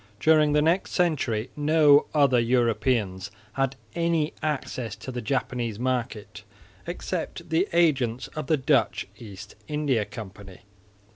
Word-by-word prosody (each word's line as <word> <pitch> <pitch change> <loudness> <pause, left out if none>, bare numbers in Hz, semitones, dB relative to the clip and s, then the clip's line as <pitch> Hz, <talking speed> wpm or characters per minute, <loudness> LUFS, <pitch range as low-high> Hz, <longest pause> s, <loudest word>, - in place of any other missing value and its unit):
During 155 -2 +4
the 150 0 +3
next 170 +4 +1
century 130 - 0
no 150 -1 +4
other 140 -5 +4
Europeans 115 -5 +1 0.2
had 135 0 0 0.2
any 165 -2 0
access 130 -7 -3
to 110 +5 -8
the 125 -1 -4
Japanese 120 -2 -2
market 120 -4 -3 0.4
except - - -5
the 170 +5 +2
agents 135 -8 +2
of 155 -3 -6
the 155 - +3
Dutch 130 - +1
East 105 -2 -10
India 145 -7 0
Company. 100 -3 -10
130 Hz, 125 wpm, -26 LUFS, 115-150 Hz, 0.4 s, During